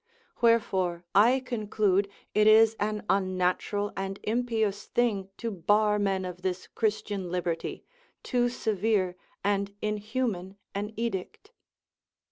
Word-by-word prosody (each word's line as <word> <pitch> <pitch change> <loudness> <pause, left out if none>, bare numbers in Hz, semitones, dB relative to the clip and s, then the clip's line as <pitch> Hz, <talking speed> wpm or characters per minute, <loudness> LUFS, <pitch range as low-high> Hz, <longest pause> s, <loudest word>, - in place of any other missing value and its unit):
Wherefore 190 -7 +2
I 240 +6 +5
conclude 210 -5 0 0.2
it 210 0 +4
is 220 +1 +7
an 210 0 -2
unnatural 190 +2 0
and 195 0 -4
impious 220 -3 0
thing 210 -6 0
to 230 -1 -3
bar 210 +3 +2
men 195 -2 0
of 180 0 -7
this 185 -1 -2
Christian 210 -4 -2
liberty, 175 -2 -3 0.4
too 245 -1 +1
severe 210 -5 0 0.3
and 200 0 0
inhuman 210 -2 -2 0.2
an 205 +2 -3
edict. 230 - -4
205 Hz, 110 wpm, -28 LUFS, 190-220 Hz, 0.4 s, is